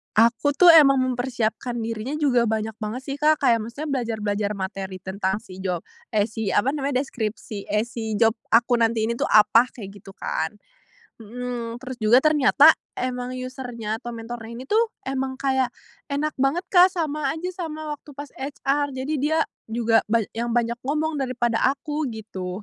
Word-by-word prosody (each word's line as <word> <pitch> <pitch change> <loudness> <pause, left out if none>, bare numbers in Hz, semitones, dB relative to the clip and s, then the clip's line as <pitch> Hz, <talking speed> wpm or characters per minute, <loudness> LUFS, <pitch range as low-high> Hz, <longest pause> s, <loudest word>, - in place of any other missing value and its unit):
Aku 235 +6 +4
tuh 350 +5 +5
emang 275 -4 +7
mempersiapkan 245 -2 -1
dirinya 225 +2 -4
juga 255 -6 +3
banyak 220 -1 -1
banget 220 +2 -4
sih, 275 - -2
Kak, 300 +1 +3
kayak 235 -5 +3
maksudnya 280 +8 -6
belajar-belajar 210 -4 -1
materi 190 -1 -5
tentang 190 +2 -2
si 205 -5 -13
job 180 -3 -1 0.3
eh, 210 -1 +2
si, 220 -2 -3
apa 205 - +2
namanya, 275 -2 0
deskripsi 220 -5 -4
eh, 210 +3 +1
si 220 -3 -4
job 225 -1 +4 0.2
aku 240 +2 +4
nanti 225 -1 +1
ini 235 - -1
tuh - - -2
apa 220 +2 +6
kayak, 210 -6 -9 0.2
gitu 195 - -11
kan. 160 -4 -3 0.7
Mhm, 240 +1 -6
terus 260 -1 -7
juga 235 +4 +5
ternyata 300 0 +6 0.3
emang 250 0 -3
user-nya 245 -4 -5
atau 240 0 -7
mentornya 230 0 -7
ini 250 - -7
tuh 450 +1 +2
emang 265 0 -2
kayak 265 -1 +1 0.4
enak 295 +2 -1
banget, 275 +7 +1
Kak, 365 0 +6
sama 305 -4 -1
aja 355 +3 -4 0.2
sama 310 -1 -6
waktu 295 0 -8
pas 285 0 -8
HR 280 +1 -1
jadi 265 +4 -3
dia 305 +4 +1 0.3
juga 225 0 +2
ba 225 +1 +2
yang 235 +1 -3
banyak 235 0 0
ngomong 305 +1 -1
daripada 240 -3 0 0.2
aku, 300 0 -3
gitu. 205 -4 -6
240 Hz, 170 wpm, -24 LUFS, 220-275 Hz, 0.7 s, emang